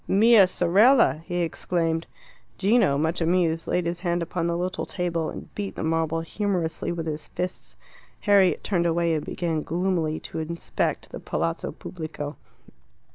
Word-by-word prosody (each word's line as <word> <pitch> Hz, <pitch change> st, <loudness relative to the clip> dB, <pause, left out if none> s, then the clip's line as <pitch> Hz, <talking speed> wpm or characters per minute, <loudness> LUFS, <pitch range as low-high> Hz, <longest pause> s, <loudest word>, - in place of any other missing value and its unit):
"Mia 215 Hz, 0 st, +6 dB
sorella!" 185 Hz, -, +4 dB
he 175 Hz, -1 st, -1 dB
exclaimed. 165 Hz, 0 st, -1 dB, 0.5 s
Gino, 200 Hz, -, +3 dB
much 160 Hz, +4 st, 0 dB
amused, 165 Hz, -1 st, +1 dB
laid 180 Hz, -1 st, 0 dB
his 170 Hz, 0 st, -2 dB
hand 175 Hz, -1 st, 0 dB
upon 170 Hz, 0 st, -2 dB
the 170 Hz, 0 st, 0 dB
little 185 Hz, +1 st, -2 dB
table, 170 Hz, -3 st, -2 dB
and -, -, -9 dB
beat 200 Hz, -1 st, -4 dB
the -, -, -4 dB
marble 165 Hz, 0 st, 0 dB
humorously 175 Hz, -2 st, -2 dB
with 170 Hz, -1 st, -3 dB
his 155 Hz, -1 st, -4 dB
fists. 180 Hz, 0 st, -5 dB, 0.4 s
Harriet 200 Hz, -3 st, +4 dB
turned 175 Hz, -4 st, +1 dB
away 170 Hz, 0 st, +1 dB
and 155 Hz, -, -1 dB
began 165 Hz, -3 st, -2 dB
gloomily 170 Hz, -2 st, -1 dB
to -, -, -6 dB
inspect 170 Hz, +2 st, -2 dB
the -, -, -6 dB
Palazzo 85 Hz, 0 st, -2 dB
Pubblico. 155 Hz, -3 st, -6 dB
170 Hz, 150 wpm, -25 LUFS, 160-185 Hz, 0.5 s, Mia